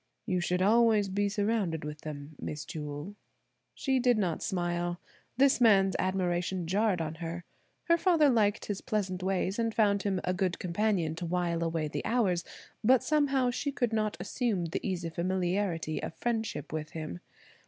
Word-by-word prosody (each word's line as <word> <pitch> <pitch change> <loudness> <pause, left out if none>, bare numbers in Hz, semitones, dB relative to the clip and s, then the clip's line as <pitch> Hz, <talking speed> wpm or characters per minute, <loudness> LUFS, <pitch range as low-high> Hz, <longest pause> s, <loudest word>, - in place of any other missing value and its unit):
"You 180 - 0
should 180 +1 0
always 215 -1 +4
be 200 +1 0
surrounded 200 -6 0
with 150 0 -6
them, 150 0 -7
Miss 150 0 -5
Jewel." 150 +4 -6 0.6
She 265 -2 +1
did 245 -2 +3
not 180 -6 0
smile. 175 -1 -1 0.4
This 270 -1 +4
man's 195 -4 +5
admiration 180 -1 0
jarred 195 +1 +1
on 160 -1 -2
her. 170 +1 -4 0.4
Her 335 0 +3
father 330 -4 +4
liked 215 -6 +2
his 205 -2 -3
pleasant 200 -6 -2
ways 190 +2 -1
and 230 -1 0
found 200 -2 +3
him 190 -1 0
a 180 - 0
good 185 -1 0
companion 180 -2 0
to 175 0 -4
wile 170 -1 0
away 165 -2 -1
the 150 - -4
hours, 200 -8 +1 0.4
but 255 +3 +5
somehow 275 -4 +2
she 285 +4 -2
could 245 -4 -1
not 215 -5 0
assume 200 -1 -1
the 165 - -2
easy 175 -4 -3
familiarity 180 -1 -1
of 165 - -5
friendship 225 -4 -2
with 155 -1 -4
him. 155 - -5
190 Hz, 165 wpm, -30 LUFS, 170-220 Hz, 0.6 s, man's